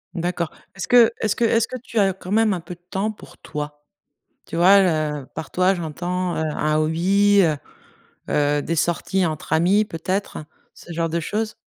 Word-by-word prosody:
D'accord, 175 -1 -2 0.2
est-ce 195 - -5
que 245 -2 +6
est-ce 215 -2 +1
que 235 - +1
est-ce 230 0 +2
que 255 - -6
tu 230 -3 -2
as 195 -2 +3
quand 185 0 -10
même 220 0 +3
un 180 - -3
peu 175 - -8
de 175 - -15
temps 200 +4 -1
pour 215 - -15
toi? 150 -1 -7 0.6
Tu - - -7
vois 190 +4 +7
le 155 -5 0
par 160 - -6
toi, 185 +2 +2
j'entends, 175 +2 -3
heu, - - -1
un 150 0 0
hobby, 190 +6 +3
heu 160 -4 +2 0.7
heu, 145 0 +2
des 165 - -2
sorties 175 +3 0
entre 155 -1 -2
amis, 190 +6 +3
peut-être, 185 0 -3 0.3
ce 175 - -11
genre 165 0 -1
de 170 +1 -1
choses? 215 +6 -3
175 Hz, 190 wpm, -22 LUFS, 160-200 Hz, 0.7 s, vois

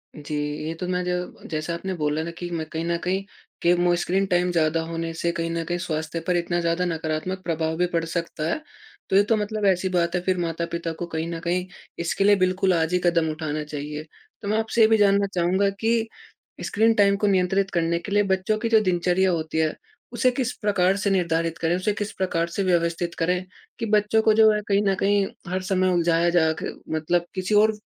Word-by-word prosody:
जी। 150 0 -6 0.3
ये 160 - -2
तो 180 +2 -5
मैं 180 0 -1
ज 180 0 -4
जैसा 155 +2 -2
आपने 190 +3 -4
बोला 150 -2 -1
ना 170 - -5
कि 175 +1 -7
मैं 165 -2 -2
कहीं 165 0 -3
न 170 0 0
कहीं 190 +2 0 0.4
के 175 - +4
मो 175 0 +2
स्क्रीन 190 +3 0
टाइम 180 -1 +1
ज़्यादा 165 -1 +1
होने 165 0 -3
से 170 +1 -1
कहीं 165 0 -3
न 165 0 -2
कहीं 175 +1 -2
स्वास्थ्य 160 -1 -3
पर 180 - +2
इतना 175 0 -1
ज़्यादा 170 +2 0
नकारात्मक 165 +2 -3
प्रभाव 160 -2 -1
भी 180 - +2
पड़ 165 -1 +1
सकता 165 -1 -4
है। 310 - -2 0.5
तो - - +1
ये 200 - +7
तो 225 +2 +2
मतलब, 210 0 -2
ऐसी 190 -1 +2
बात 175 -1 0
है, 180 - 0
फिर 185 +1 0
माता-पिता 170 0 -3
को 175 - -5
कहीं 160 -1 -3
न 165 - -4
कहीं 180 +2 -1 0.3
इसके 170 +3 0
लिए 205 +1 +6
बिल्कुल 185 0 +2
आज 165 0 0
ही 180 - +3
कदम 170 -2 +2
उठाना 155 -1 -3
चाहिए। 150 0 -6 0.4
तो 205 - -6
मैं 215 +2 +1
आपसे 225 +1 0
ये 220 - +8
भी 220 0 +4
जानना 200 -1 +4
चाहूँगा 185 +3 +2
कि 225 0 +1 0.6
स्क्रीन 225 +2 +3
टाइम 200 -1 +4
को 210 - +1
नियंत्रित 190 0 +2
करने 170 -1 +1
के 200 - -8
लिए 205 +1 +4
बच्चों 190 +2 0
की 230 +1 -1
जो 225 -1 +6
दिनचर्या 185 0 +2
होती 160 -2 -2
है 160 -1 +1 0.4
उसे 255 - +3
किस 250 -1 -1
प्रकार 190 -2 +2
से 200 0 0
निर्धारित 165 -3 0
करें? 165 +1 +1
उसे 185 +3 0
किस 205 +1 -4
प्रकार 170 -3 0
से 195 +3 -2
व्यवस्थित 170 -1 0
करें 180 +2 +1 0.4
कि 230 - -1
बच्चों 210 +1 +3
को 220 - +5
जो 220 0 +6
है 210 0 0
कहीं 200 0 +3
न 195 -1 +2
कहीं 200 0 +2 0.3
हर 185 +1 -1
समय 185 0 +1
उलझाया 170 0 +2
जा 165 -2 +3
के - - -3 0.2
मतलब 170 +2 0
किसी 185 +3 0
और 215 +1 +5
180 Hz, 225 wpm, -24 LUFS, 165-195 Hz, 0.6 s, ये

